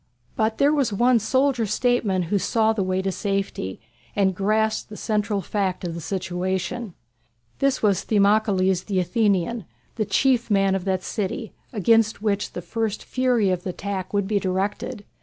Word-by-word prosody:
But 220 0 0
there 285 +2 +4
was 280 -6 +1
one 240 +4 +3
soldier 260 0 +1
statesman 215 -4 +1
who 195 +4 0
saw 220 +2 +2
the 215 - -1
way 185 0 0
to 195 - 0
safety, 195 - -3 0.4
and 195 -2 +2
grasped 215 +4 0
the 210 - -9
central 210 -2 -1
fact 195 -3 -2
of 175 -2 -3
the 170 - -6
situation. 185 +3 -3 0.6
This 275 -3 +1
was 200 -4 +3
Themistocles 200 -3 +2
the 195 -3 0
Athenian, 200 +2 +1 0.3
the 215 - 0
chief 250 +1 +2
man 195 -2 +3
of 190 -1 -2
that 190 -2 0
city, 210 +1 -3 0.2
against 225 0 +3
which 205 -1 -1
the 175 - -6
first 220 +3 -2
fury 245 -6 +1
of 180 -1 -1
the 185 - -5
attack 190 0 -4
would 200 -1 0
be 210 -1 +1
directed. 200 +4 -2
205 Hz, 165 wpm, -24 LUFS, 190-225 Hz, 0.6 s, there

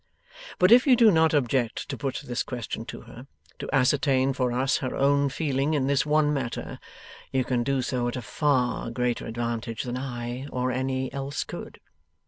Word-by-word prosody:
But 180 +2 +4
if 250 +4 +7
you 260 - +7
do 230 -3 +6
not 160 -2 +4
object 130 -5 0
to 135 - -3
put 135 0 -4
this 120 0 -2
question 115 -2 -5
to - - -8
her 125 +4 -12 0.3
to - - -6
ascertain 135 0 +2
for 125 -1 0
us 130 +2 +1
her 130 - -3
own 140 +1 +3
feeling 140 +1 0
in 135 -3 +1
this 140 +1 +1
one 150 0 +3
matter 130 -5 -4 0.5
you 130 -1 +1
can 125 -1 0
do 135 +1 0
so 125 -1 -1
at 120 - -3
a 125 - -4
far 125 -2 0
greater 120 0 -2
advantage 115 0 -3
than 125 0 -4
I 125 0 -5
or 125 -2 -2
any 130 0 -2
else 140 +1 -3
could. - - -9
130 Hz, 185 wpm, -26 LUFS, 125-140 Hz, 0.5 s, if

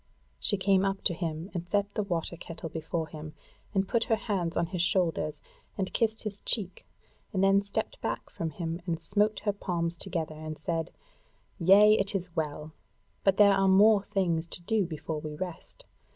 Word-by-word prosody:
She 205 - +1
came 190 0 +3
up 195 0 -1
to 180 - +2
him 165 +1 -4
and 175 -2 -4
set 205 0 0
the - - 0
water 175 -4 -2
kettle 165 -1 -7
before 160 +1 -3
him, 155 0 -8 0.4
and 195 -2 +1
put 230 +2 +1
her 225 - +3
hands 195 -6 -2
on 170 - +2
his 180 0 -3
shoulders, 165 -5 +1 0.4
and 190 -2 -2
kissed 220 -1 +1
his 205 -2 -3
cheek, 195 -5 -2 0.4
and 195 -3 +1
then 195 0 +5
stepped 200 - -3
back - - -3
from 165 - -3
him 165 +2 -4
and 165 -2 -1
smote 205 +5 +1
her 205 -1 0
palms 170 -4 -2
together, 165 -4 -3
and 155 0 -7
said: 165 +1 -2 0.7
"Yea, 205 +5 +7
it 195 +1 +1
is 180 -2 -4
well! 150 0 -3 0.5
But 195 -1 +3
there 205 -1 +7
are 195 0 +3
yet 190 - +6
more 210 +1 +6
things 180 -5 0
to 175 - -7
do 205 0 +1
before 155 -1 -4
we 150 0 -6
rest. 180 0 -7
180 Hz, 190 wpm, -29 LUFS, 165-200 Hz, 0.7 s, Yea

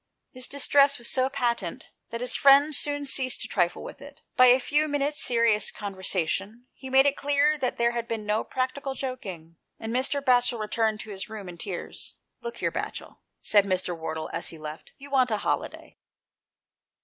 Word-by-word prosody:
His 255 -1 -5
distress 280 0 +4
was 235 - -2
so 260 0 +2
patent 235 -9 -2 0.2
that 230 +1 -5
his 250 - +1
friend 280 +2 +6
soon 290 -1 0
ceased 260 -2 +2
to - - -3
trifle 175 -3 0
with - - -10
it. 285 +1 -13
By 255 - +7
a 250 +1 +6
few 295 +4 +1
minutes 290 0 0
serious 230 -3 +3
con 205 -1 -6
versation 190 +4 -2
he 265 - -10
made 265 +1 +5
it 285 0 +3
clear 290 +1 +2
that 255 -3 -1
there 235 0 +2
had 235 -1 -4
been 220 -2 -4
no 210 +1 0
practical 265 +1 -3
joking, 190 -12 -7 0.2
and 225 +1 -5
Mr. 265 +3 +1
Batchel 245 -3 +2
returned 215 0 -1
to 220 - -9
his 195 +2 -6
room 215 -3 -8
in 175 -1 -10
tears. 195 -5 -7 0.3
"Look 470 - -6
here, - - -1
Batchel," - - -6 0.2
said 205 -2 +4
Mr. 185 -2 -1
Wardle 160 -1 -5
as - - -1
he 165 - -6
left, 155 0 -9
" - - -47
you 280 +1 -12
want 260 -2 +3
a 215 - 0
holiday." - - -4
245 Hz, 195 wpm, -26 LUFS, 205-275 Hz, 0.3 s, By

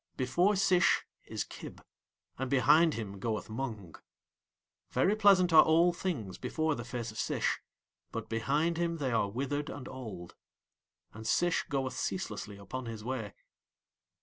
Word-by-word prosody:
Before 175 +11 +2
Sish 185 -2 +3 0.2
is - - -2
Kib, - - -10 0.6
and 130 -1 -2
behind 150 +5 +5
him 100 -3 -5
goeth 110 0 -3
Mung. 110 -8 -5 1.0
Very 200 +3 +2
pleasant 195 -5 +5
are 155 - +11
all 170 +2 +4
things 140 - -4
before 155 -1 0
the 120 - -5
face 120 -2 -5
of 110 - -8
Sish, - - 0 0.5
but - - -5
behind 145 +9 0
him 170 -1 0
they 135 -5 -1
are 110 -3 +1
withered 140 +6 -2
and 130 -3 -7
old. 110 -10 -8 0.8
And 110 +2 -7
Sish 175 +8 +2
goeth 135 -3 -1
ceaselessly 105 - -3
upon 115 +6 -6
his 110 -2 -6
way. 115 -5 -4
130 Hz, 145 wpm, -31 LUFS, 110-165 Hz, 1.0 s, are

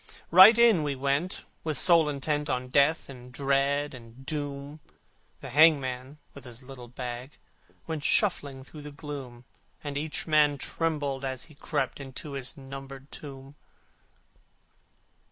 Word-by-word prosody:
Right 190 +6 +10
in 235 -7 +6
we 145 -2 -1
went, 140 +6 -1 0.2
with 155 -3 -2
soul 165 -1 +5
intent 150 +1 -2
On 125 0 -2
Death 145 +4 +3
and 125 -2 -11
Dread 140 +2 0
and 120 +1 -13
Doom: 145 0 -5 0.6
The 135 - -8
hangman, 140 -2 +3 0.2
with 140 - -12
his 120 0 -10
little 125 -2 -10
bag, 125 +2 -7 0.5
Went 160 -3 -4
shuffling 140 -11 +1
through 150 +3 -11
the 150 0 -8
gloom: 135 -5 -8 0.4
And 145 -1 -3
I 155 - -3
trembled 150 -2 0
as 130 -2 -3
I - - -14
groped 145 -2 -3
my 140 - -7
way - - -9
Into 140 +3 -7
my 135 0 -5
numbered 135 0 -9
tomb. 135 -1 -10
140 Hz, 140 wpm, -28 LUFS, 130-150 Hz, 0.6 s, Right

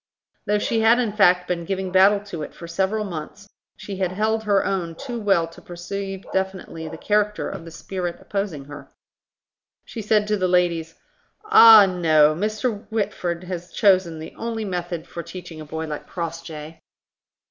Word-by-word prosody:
Though 210 - +3
she 225 +2 0
had 225 +2 +5
in 235 -4 0
fact 180 -3 +4
been 175 -1 -2
giving 190 +1 -3
battle 195 +2 +5
to 195 -6 -7
it - - -7
for 170 - -9
several 190 +5 -1
months, 185 +3 -7 0.3
she 195 -2 -7
had 185 -1 -1
held 220 +2 0
her 200 -2 +2
own 175 -4 -2
too 245 +3 -6
well 195 -6 +2
to - - -15
perceive 195 +2 -6
definitely 190 -4 -3
the 160 +1 -7
character 210 +3 0
of 190 -4 -7
the - - -8
spirit 175 +1 -5
opposing 195 -9 -4
her. 145 -1 -11 1.0
She 230 - -7
said 210 0 +2
to 210 - +2
the 185 -1 +1
ladies, 170 -2 +1 0.5
"Ah, 225 - +9
no! 160 -5 +4
Mr. 215 +4 -2
Whitford 195 -5 -2
has 180 -1 -6
chosen 185 -5 +3
the 160 0 -9
only 225 -1 -3
method 175 -3 -4
for 170 - -6
teaching 170 -1 -9
a - - -8
boy 160 +1 -5
like 150 -2 -6
Crossjay." 165 -2 -6
185 Hz, 170 wpm, -23 LUFS, 165-205 Hz, 1.0 s, Ah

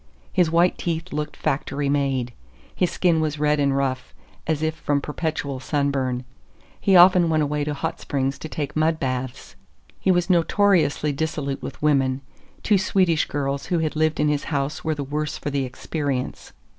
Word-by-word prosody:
His 180 -3 +3
white 170 +2 +3
teeth 165 0 -3
looked 150 0 -3
factory 140 +1 -1
made. 135 -4 0 0.4
His 180 - +1
skin 170 -3 +2
was 155 -1 -1
red 150 0 +2
and 140 -1 +2
rough, 130 -2 -2 0.3
as 160 -1 0
if 160 0 +1
from 145 -2 0
perpetual 145 -2 -3
sunburn; 135 -3 -1 0.6
he 195 - +3
often 180 -1 +7
went 155 -1 +2
away 150 0 -1
to 150 -1 -2
hot 160 +3 -3
springs 135 0 -2
to 160 - -7
take 145 -2 -4
mud 155 +1 +2
baths. 130 -1 -4 0.4
He - - 0
was 175 -1 +3
notoriously 170 -4 +3
dissolute 140 -2 -3
with - - -8
women. 135 -3 +2 0.4
Two 205 -3 +3
Swedish 185 -4 +2
girls 140 -1 -2
who 175 - +1
had 160 -2 -1
lived 155 0 +1
in 150 - +3
his 150 -1 0
house 140 -1 -2
were 160 -1 0
the 145 - -3
worse 150 +2 -3
for 145 - -4
the 140 -1 0
experience. 130 0 -4
150 Hz, 175 wpm, -23 LUFS, 140-160 Hz, 0.6 s, often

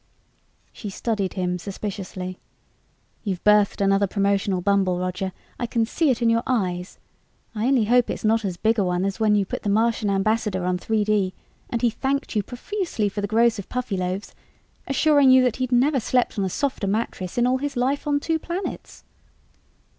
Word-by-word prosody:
She 210 - -7
studied 200 -1 -2
him 180 -1 -2
suspiciously. 185 -1 -6 0.8
"You've 190 -5 -3
birthed 210 -1 +4
another 195 0 +3
promotional 200 -1 +1
bumble, 190 -1 +2
Roger. 185 +1 -2 0.3
I 240 - -1
can 230 0 +1
see 310 +6 +1
it 245 -2 +1
in 230 - +4
your 230 0 +2
eyes. 185 -7 -1 0.6
I 220 +2 -1
only 260 -4 +3
hope 245 +2 +3
it's - - -4
not 225 +1 +3
as 185 -3 -3
big 220 +4 +1
a - - +3
one 180 0 0
as 195 +2 -3
when 215 -1 +3
you 200 -1 +2
put - - -5
the 205 - -2
Martian 220 0 +2
ambassador 200 -1 0
on 180 0 0
3D 210 -2 +1 0.4
and 235 0 -3
he 235 - +4
thanked 275 +2 -2
you 210 - +3
profusely 250 - -3
for 205 +1 -4
the 205 - -1
gross 225 +1 +3
of 195 - -8
Puffyloaves, 195 -6 -3 0.5
assuring 285 0 +4
you 260 0 +7
that 250 -3 +1
he'd 255 -1 -2
never 265 +3 +3
slept 245 -1 0
on 195 - +1
a - - -1
softer 265 -2 -2
mattress 195 -3 -2
in 240 - +3
all 255 +1 +2
his 280 -1 -3
life 270 +4 0
on 290 -1 +2
two 320 +2 -1
planets." 350 +4 -6
215 Hz, 185 wpm, -23 LUFS, 195-245 Hz, 0.8 s, you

